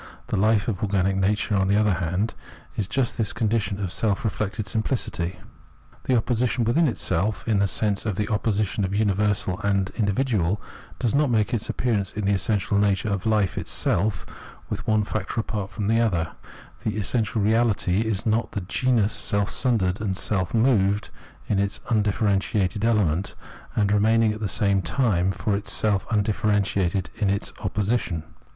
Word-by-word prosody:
The - - 0
hfe 105 +1 +3
of 105 -6 -2
organic 95 -2 +1
nature, 105 +2 +1
on 95 -1 +2
the 100 - +3
other 105 -2 +3
hand, 90 +5 -1 0.4
is 100 - -1
just 120 +2 -1
this 110 -3 0
condition 105 -3 0
of 95 -3 -3
self 105 -3 0
reflected 110 0 -2
simpHcity. 105 -5 -1 0.7
The 130 - +2
opposition 120 +1 0
within 135 +9 +3
itself, 105 -3 -1
in 110 -3 +2
the 100 - +3
sense 100 0 0
of 105 - -1
the 105 +2 -1
opposition 105 -1 0
of 95 +1 -1
universal 100 -2 +1
and 100 -2 0
individual, 105 -3 0 0.4
does 120 - 0
not 145 0 +3
make 110 -2 +1
its 115 -3 -1
appearance 105 -6 -1
in 105 -2 -3
the 100 - +3
essential 100 +1 0
nature 100 +1 +1
of 100 -2 -2
hfe 105 -3 +1
itself 100 0 0 0.5
with - - -4
one 110 -1 +3
factor 105 +1 -3
apart 105 -3 -3
from 100 +2 -4
the 115 +2 +3
other; 85 -8 0 0.5
the 110 -1 -2
essential 110 +3 0
reahty 105 -3 +2
is 110 -4 -2
not 110 -1 0
the 100 - -2
genus, 110 +3 +1
self 100 0 0
sundered 105 -7 +1
and 95 -4 -1
self 95 -3 -1
moved 110 -4 +2 0.4
in 100 - +1
its 100 +2 -1
undifierentiated 105 -2 +1
element, 100 -5 +1 0.4
and 105 -2 +2
remaining 110 +1 +3
at 105 - -7
the 110 - -1
same 100 0 +1
time 95 0 +1
for 100 +2 -1
itself 100 0 0
undifierentiated 100 -3 +1
in 105 -3 +2
its 100 +1 -1
opposition. 100 -6 -1
105 Hz, 165 wpm, -24 LUFS, 95-110 Hz, 0.7 s, hfe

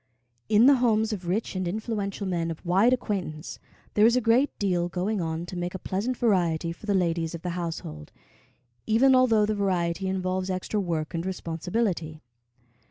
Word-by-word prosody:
In 220 +2 +6
the 275 0 +7
homes 220 -2 +2
of 185 -4 -6
rich 200 +3 -1
and 185 -1 -2
influential 205 0 -3
men 170 -3 -1
of 165 +1 -7
wide 195 +8 +4
acquaintance, 190 -11 -3 0.3
there 210 - +3
is 235 - +3
a - - +4
great 245 +4 +3
deal 180 -3 0
going 190 +3 -1
on 165 0 -3
to 180 - -8
make 175 +1 -3
a - - -1
pleasant 210 +7 -2
variety 175 -7 +1
for 170 +6 -11
the 200 - +2
ladies 170 -2 0
of 165 - -9
the 180 - -2
household, 165 - -5 0.8
even 250 +5 +5
although 235 -5 +4
the 215 - 0
variety 190 -2 -1
involves 185 0 -2
extra 185 +3 -2
work 165 -4 -2
and 165 0 -2
responsibility. 175 -2 -2
185 Hz, 175 wpm, -26 LUFS, 170-215 Hz, 0.8 s, the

